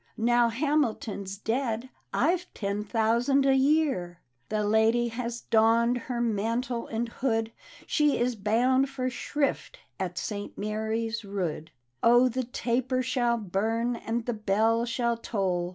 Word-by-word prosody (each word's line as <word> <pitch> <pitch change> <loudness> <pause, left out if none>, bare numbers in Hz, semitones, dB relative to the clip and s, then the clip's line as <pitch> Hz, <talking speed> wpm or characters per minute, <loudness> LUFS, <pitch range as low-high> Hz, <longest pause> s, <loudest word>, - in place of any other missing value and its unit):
Now 240 +1 +3
Hamilton's 230 -7 -1
dead, 235 +2 -2 0.2
I've 350 +6 +1
ten 200 0 -2
thousand 235 +6 +2
a 270 - +5
yearl 270 - +2 0.2
" 120 -1 -45
The 215 0 0
lady 220 +3 +3
has 235 0 -4
donned 230 +2 +3
her 245 -1 -1
mantle 235 +2 -1
and 230 +1 -2
hood, 225 -2 -1 0.3
She 300 -2 +2
is 245 0 0
bound 245 +6 +2
for 255 -2 -2
shrift 280 +3 -2 0.2
at 180 -2 -3
St. 205 0 -5
Mary's 220 +2 -2
Rood: 180 -6 -3
— 120 0 -49
" - - -46
Oh 240 +2 +6
I - - +3
the 255 +2 -2
taper 255 +1 -1
shall 240 -1 +1
burn, 225 +4 -1
and 230 0 -3
the 240 - -1
bell 220 +2 +1
shall 235 0 0
toll. 185 -6 -1
230 Hz, 150 wpm, -28 LUFS, 215-250 Hz, 0.3 s, Oh